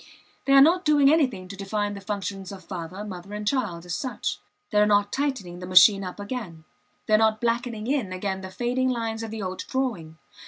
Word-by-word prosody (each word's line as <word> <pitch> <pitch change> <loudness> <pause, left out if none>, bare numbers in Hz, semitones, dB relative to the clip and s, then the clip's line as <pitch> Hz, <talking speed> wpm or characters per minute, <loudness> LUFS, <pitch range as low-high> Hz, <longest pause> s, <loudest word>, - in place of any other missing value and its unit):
They 275 - +3
are 275 - +9
not 355 +4 +4
doing 290 -2 +5
anything 255 - +1
to 195 - -8
define 205 +1 -2
the 200 - -8
functions 195 -2 -4
of 190 -2 -10
father, 180 +2 -6
mother, 195 0 -8
and 210 0 -5
child, 205 -10 -1
as 175 - -5
such; 260 +6 -3 0.3
they 210 - +3
are 210 - +4
not 205 -1 +2
tightening 255 -12 -2
the 180 - -7
machine 190 +2 +7
up 180 +1 -7
again; 200 -7 -6 0.4
they 215 - 0
are - - +8
not 220 -1 +3
blackening 235 -1 -1
in 255 -7 -1
again 190 +1 -3
the 190 - -7
fading 250 +5 -1
lines 230 -2 -2
of 225 - -5
the 220 -1 -5
old 185 0 -4
drawing. 210 -13 -3
210 Hz, 210 wpm, -25 LUFS, 185-245 Hz, 0.4 s, are